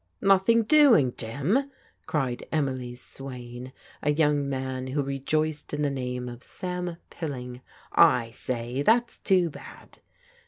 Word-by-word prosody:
"Nothing 195 +4 +4
doing, 230 - +5
Jim?" 145 - -1 0.4
cried 130 -5 -1
Emily's 130 -5 -2
swain, 125 -1 -8 0.3
a 150 - 0
young 145 -2 +2
man 130 -1 -3
who 140 +2 -1
rejoiced 150 +3 -2
in 150 - -1
the 145 - +1
name 125 -2 -3
of 120 0 -8
Sam 180 -2 -4
Pilling. 125 -6 -6 0.3
" - - -35 0.3
I 115 -1 -8
say, 120 +1 -3
that's 235 +8 +2
too 180 -4 +2
bad." - - -12
140 Hz, 130 wpm, -27 LUFS, 125-170 Hz, 0.4 s, doing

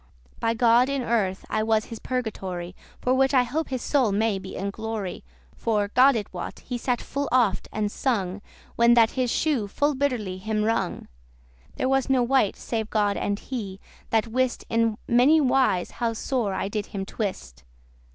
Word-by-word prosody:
By 230 0 0
God, 240 +2 +4
in 275 -2 -1
earth 200 -6 0
I 215 - 0
was 220 0 +1
his 225 - -7
purgatory, 190 -8 -4 0.3
For 250 - +2
which 270 +1 +3
I 255 - +6
hope 295 +7 -3
his 260 -2 -3
soul 260 -7 +2
may 210 0 +1
be 190 0 -8
in 200 +1 -3
glory. 220 -3 -5 0.3
For, 210 -3 0
God 260 +4 +5
it 210 -4 -4
wot, 180 - -6
he 245 - -5
sat 245 0 0
full 285 +1 -3
oft 245 -5 +2
and 210 -1 -1
sung, 200 -7 -1 0.3
When 235 0 +5
that 230 -2 +5
his 255 -2 -1
shoe 270 -6 0
full 290 +8 +1
bitterly 245 -9 -1
him 215 +2 -1
wrung.* 215 -4 +1
*pinched - - -25
There 260 - 0
was 270 0 +1
no 260 -2 +3
wight, 245 -4 +2
save 220 -2 -3
God 205 -2 +1
and 205 0 -1
he, 205 -6 -6 0.3
that 225 0 +2
wist 255 +2 -1
In 230 -1 +2
many 255 +7 +5
wise 255 - +2
how 230 -1 -2
sore 225 -3 -1
I - - -2
did 205 0 -3
him 195 -1 -5
twist. 125 - -5
225 Hz, 185 wpm, -25 LUFS, 200-255 Hz, 0.3 s, I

